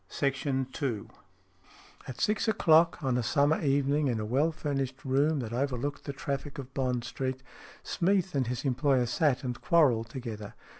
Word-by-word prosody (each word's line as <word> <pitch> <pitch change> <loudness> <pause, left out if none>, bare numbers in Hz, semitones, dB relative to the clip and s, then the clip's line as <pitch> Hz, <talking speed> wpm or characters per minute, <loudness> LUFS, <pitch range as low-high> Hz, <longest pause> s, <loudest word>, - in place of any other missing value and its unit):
SMEATH 135 0 -1
19 135 -2 0
IV 120 -8 -2 1.0
AT 130 - -7
six 210 +1 +1
o'clock 165 -6 +4
on 130 -2 +1
a - - +1
summer 145 +6 +2
evening, 140 +1 +2
in 120 -4 0
a 110 - -3
well 140 +9 +2
furnished 135 -3 -3
room 140 +4 +2
that 115 -1 -5
overlooked 135 +2 -2
the 140 - -3
traffic 140 0 -4
of 135 -1 -8
Bond 125 -3 -1
Street, 130 +2 -4 0.4
Smeath 190 0 +1
and 135 -4 0
his 125 +3 -3
employer 130 -1 +2
sat 135 +3 +1
and 125 -1 -4
quarrelled 125 -8 +3
together. 115 -5 -7
135 Hz, 165 wpm, -29 LUFS, 125-145 Hz, 1.0 s, o'clock